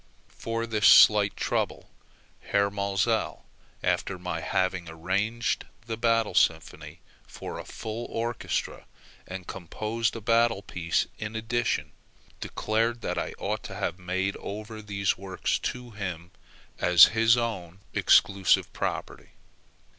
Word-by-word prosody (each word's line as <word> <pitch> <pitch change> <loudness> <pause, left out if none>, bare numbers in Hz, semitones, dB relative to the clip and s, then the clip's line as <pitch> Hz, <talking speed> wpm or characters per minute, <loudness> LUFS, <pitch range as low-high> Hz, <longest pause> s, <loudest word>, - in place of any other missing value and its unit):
For 115 0 -3
this 110 -3 +2
slight - - +7
trouble - - -2 0.5
Herr 100 0 +1
Maelzel, 100 +3 -1 0.4
after 100 - 0
my 90 -2 -4
having 90 -1 -1
arranged 100 +8 -1 0.2
the 115 -1 -3
"Battle 115 -2 +1
Symphony" 80 -3 0 0.3
for - - -7
a - - -8
full 110 +2 -6
orchestra, 115 -1 -3 0.4
and 95 -1 -7
composed 110 +6 -3
a - - -4
battle 115 -1 +2
piece 85 -2 -1
in 110 +1 -5
addition, 115 +1 -1 0.5
declared 115 +2 -1
that - - -2
I - - -4
ought - - -2
to - - -7
have 90 - -3
made 95 +2 -2
over 110 +2 -7
these 100 -3 -1
works 95 -1 -2
to 125 -1 -5
him 90 -5 -6 0.5
as 90 -2 +7
his 115 +1 +4
own 95 -6 -4
exclusive 95 -2 +3
property. - - -4
105 Hz, 125 wpm, -27 LUFS, 95-115 Hz, 0.5 s, slight